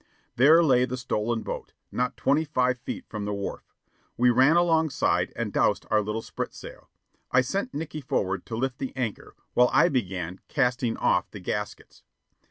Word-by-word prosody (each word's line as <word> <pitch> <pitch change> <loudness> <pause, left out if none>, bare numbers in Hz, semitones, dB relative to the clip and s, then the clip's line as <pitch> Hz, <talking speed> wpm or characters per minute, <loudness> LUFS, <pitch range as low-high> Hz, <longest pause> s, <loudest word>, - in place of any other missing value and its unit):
There 155 +7 +6
lay 125 -5 +4
the 125 0 -4
stolen 115 -1 -2
boat, - - -6 0.2
not 125 0 -1
twenty 145 +4 +2
five 125 -4 0
feet 125 - -6
from 105 -2 -5
the 105 0 -2
wharf. 100 0 -6 0.4
We 125 +1 +5
ran 130 +6 +5
alongside 160 -4 +2
and - - -3
doused - - +2
our 110 - +4
little 105 +2 -3
spritsail. - - -7 0.4
I 125 - +5
sent 195 - -2
Nickey 155 0 -4
forward 95 -7 -1
to 115 - -4
lift 125 +2 -2
the 135 -1 -5
anchor, 120 -6 -4 0.2
while 125 0 +5
I 165 +6 +5
began 95 - -2
casting 125 -4 0
off - - +1
the - - -9
gaskets. - - -5
125 Hz, 170 wpm, -26 LUFS, 115-145 Hz, 0.4 s, There